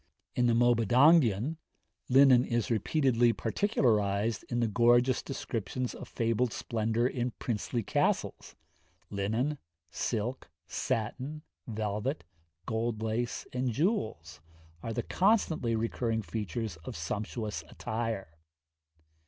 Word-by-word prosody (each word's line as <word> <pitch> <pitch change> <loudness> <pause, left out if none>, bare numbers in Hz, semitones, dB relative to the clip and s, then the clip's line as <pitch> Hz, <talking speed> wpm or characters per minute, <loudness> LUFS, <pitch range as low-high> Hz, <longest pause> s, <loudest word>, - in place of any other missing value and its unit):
In 125 -1 +2
the 115 - +3
Mabinogion, 120 - +4 0.5
linen 130 -1 +7
is 120 -2 -1
repeatedly 120 0 +3
particularised 110 - +1
in 120 - -1
the 120 - +2
gorgeous 120 +3 +4
descriptions 125 -1 -4
of - - -9
fabled 115 +1 0
splendour 115 0 -1
in 125 -1 -1
princely 115 0 -2
castles - - -1 0.6
linen, 110 +9 -1 0.3
silk, 120 +6 -3 0.2
satin, 130 +7 -3 0.2
velvet, 110 +5 -2 0.4
gold 110 0 -2
lace, 115 +2 -2
and 125 0 0
jewels, 110 - -1 0.4
are 115 - -4
the 120 +1 -2
constantly 180 - +2
recurring 115 0 -1
features 105 +1 -4
of 80 - -8
sumptuous 105 +5 -4
attire. 110 -7 -4
115 Hz, 105 wpm, -30 LUFS, 110-125 Hz, 0.6 s, linen